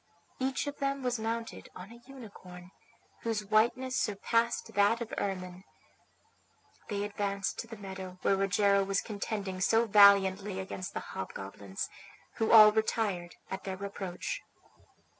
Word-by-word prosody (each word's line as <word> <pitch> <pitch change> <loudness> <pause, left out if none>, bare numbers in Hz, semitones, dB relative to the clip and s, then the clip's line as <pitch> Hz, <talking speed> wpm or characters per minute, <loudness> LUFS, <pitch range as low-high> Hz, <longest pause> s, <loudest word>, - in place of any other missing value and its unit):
Each 265 +1 -1
of 285 0 -6
them 275 -1 -1
was 245 -2 -1
mounted 230 +1 -4
on 185 +4 -10
a 235 0 -14
unicorn, 185 -8 -12 0.5
whose 220 -2 -2
whiteness 235 +5 +2
surpassed 230 +3 0
that 205 +3 +3
of 235 -2 -6
ermine. 185 -2 -4 1.3
They 205 -1 -2
advanced 200 -1 -2
to 230 - -5
the 225 -1 -9
meadow 190 -2 -8
where 195 - +3
Rogero 200 +1 +3
was 195 0 0
contending 200 -3 -4
so 225 +4 +3
valiantly 200 -2 +5
against 185 -1 -6
the - - -2
hobgoblins, 95 0 -6 0.5
who 225 - +1
all 215 -2 +10
retired 210 -5 -1 0.2
at 190 - -4
their 190 0 -5
approach. 195 - -5
200 Hz, 135 wpm, -31 LUFS, 190-225 Hz, 1.3 s, all